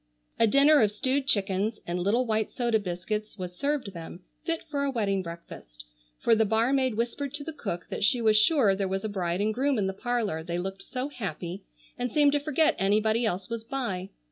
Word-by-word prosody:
A 230 - +5
dinner 280 +5 +6
of 210 -2 +3
stewed 260 +6 -1
chickens 200 0 +1
and 175 +1 -2
little 215 +8 +2
white 220 -2 0
soda 235 -3 +1
biscuits 210 +4 -4
was 180 -2 -6
served 275 -3 -2
them, 170 +1 -8 0.2
fit 330 -1 -2
for 285 -2 -2
a 280 - +1
wedding 205 -6 0
breakfast, 115 - -10 0.3
for - - +3
the 220 0 +4
barmaid 235 +3 +2
whispered 255 +5 -2
to 290 - -5
the 320 - -6
cook 195 - -4
that - - -3
she 245 +4 +3
was 220 -2 +4
sure 215 -1 +5
there 195 0 -1
was 190 +1 -2
a 215 - -2
bride 180 -2 -1
and 215 +1 +1
groom 270 +3 +1
in 205 - +1
the 190 - -1
parlor 220 -6 -1
they 170 +1 -3
looked 190 +2 -4
so 255 +6 -4
happy 190 - -5 0.3
and 245 -1 -1
seemed 290 +1 +4
to 290 - +2
forget 305 +2 +2
anybody 215 +4 +2
else 185 -2 -2
was 230 -1 -4
by. 225 -7 -3
215 Hz, 210 wpm, -28 LUFS, 190-260 Hz, 0.3 s, dinner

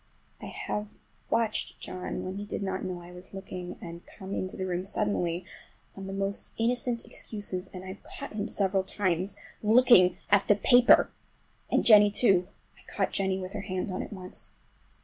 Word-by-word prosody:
I - - -6
have 210 0 -4 0.3
watched 225 -2 0
John 185 0 -5
when 185 +1 -5
he 205 - -4
did 205 - -3
not 190 -1 -2
know 180 -2 -4
I 175 - -11
was 180 +2 -12
looking, 185 -2 -7
and 170 -1 -8
come 195 -1 -8
into 185 -1 -3
the 190 - -2
room 180 -1 -2
suddenly 185 -4 -1 0.5
on 195 -1 -7
the - - -5
most 195 +1 -1
innocent 235 +1 0
excuses, 195 -3 -4
and 185 0 -8
I've 190 +2 -8
caught 280 - -8
him 210 0 -2
several 195 -3 +1
times 190 0 -1 0.2
looking 220 -5 +6
at 205 -1 +5
the 205 - +6
paper! 245 +4 +6 0.6
And - - +2
Jennie 210 -2 +8
too. 195 -4 +3 0.3
I - - -15
caught - - 0
Jennie 190 -1 +1
with 185 0 -6
her 210 - -3
hand 185 0 -3
on 185 - -2
it - - -7
once. 185 -2 -6
195 Hz, 180 wpm, -29 LUFS, 185-210 Hz, 0.6 s, Jennie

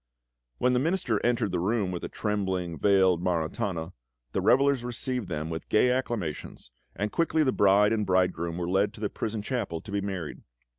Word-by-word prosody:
When 125 0 +2
the 125 - +3
Minister 150 - 0
entered 120 -4 +1
the 90 - 0
room 100 +1 0
with 90 - -4
the - - -5
trembling, 95 -5 -2
veiled 95 -4 +4
Maritana, 85 0 -2 0.4
the - - -1
revellers 135 -1 +3
received 125 -3 -3
them 80 0 -3
with 80 - -6
gay 125 +3 +4
acclamations, 110 - -3 0.2
and 105 +1 -2
quickly 160 -1 +2
the 130 - +2
bride 105 +1 +4
and 110 -1 0
bridegroom 90 -3 0
were 85 -1 -2
led 100 +3 +1
to - - -12
the 105 -1 -2
prison 110 -1 -3
chapel 105 -9 -2
to 105 - -10
be 100 0 0
married. 95 -5 -5
100 Hz, 185 wpm, -27 LUFS, 90-120 Hz, 0.4 s, veiled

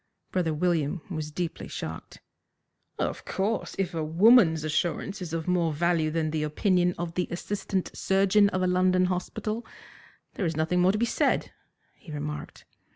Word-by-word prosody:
Brother 175 -3 0
William 160 0 0
was 155 -3 -3
deeply 170 +2 -4
shocked. - - -7 0.8
"Of - - -2
course, 205 +4 -2
if 195 -3 -1
a 160 -1 -2
woman's 165 0 +5
assurance 175 +6 -1
is 175 -3 -5
of 165 0 -3
more 175 -3 +2
value 165 0 +1
than 155 -1 -1
the 155 -1 -1
opinion 180 +3 +1
of 170 -1 -4
the 180 0 -1
assistant 190 +1 -3
surgeon 195 +1 +3
of 185 -1 -1
a - - +3
London 185 0 +3
hospital, 215 +5 -3 0.7
there 195 - -2
is 160 -1 -3
nothing 165 +3 +1
more 185 +1 +5
to 210 - -1
be 235 - +2
said," - - +1 0.4
he 165 - -13
remarked. 150 0 -6
180 Hz, 160 wpm, -27 LUFS, 160-190 Hz, 0.8 s, woman's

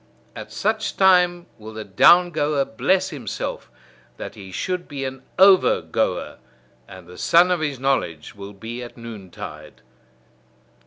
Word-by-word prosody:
At - - -9
such 215 +1 -2
time 180 -2 +4
will 110 +1 -10
the 110 0 -6
down 175 - +5
goer 145 -3 0
bless 185 +12 0
himself, 130 -9 -5 0.5
that - - -7
he 95 -2 -11
should 180 - -3
be 140 -2 -5
an 130 0 -6 0.2
over 190 0 +6
goer; - - -2 0.5
and 95 -1 -12
the 90 +1 -13
sun 175 +2 +4
of 180 - +1
his 145 -4 -3
knowledge 130 - -1
will 100 0 -10
be 115 +5 -7
at 120 0 -10
noontide. 95 -9 -10
135 Hz, 145 wpm, -22 LUFS, -, 0.5 s, over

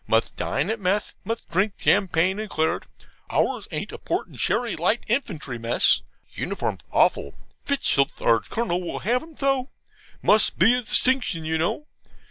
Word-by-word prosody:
Must 115 0 +1
dine 150 +10 -1
at 225 - -3
mess. 195 +2 0
Must 230 +1 -4
drink 190 +4 +1
champagne 185 +1 +2
and 215 -1 -5
claret. 160 -2 -1 0.4
Ours - - 0
ain't - - -4
a - - -8
port - - -2
and - - -15
sherry 240 -3 0
light 185 +8 +1
infantry 170 - -2
mess. 115 +1 +4 0.3
Uniform's - - -3
awful. - - +2 0.3
Fitzstultz, 205 - +1
our 115 -1 +3
Colonel, 185 - -2
will 175 - -5
have 245 +3 +2
'em 320 -2 -14
so. 270 -1 0 0.5
Must 215 0 +4
be 220 +7 +5
a 250 - +1
distinction 245 -8 +2
you 160 0 0
know. 170 - -1
200 Hz, 160 wpm, -24 LUFS, 160-240 Hz, 0.5 s, be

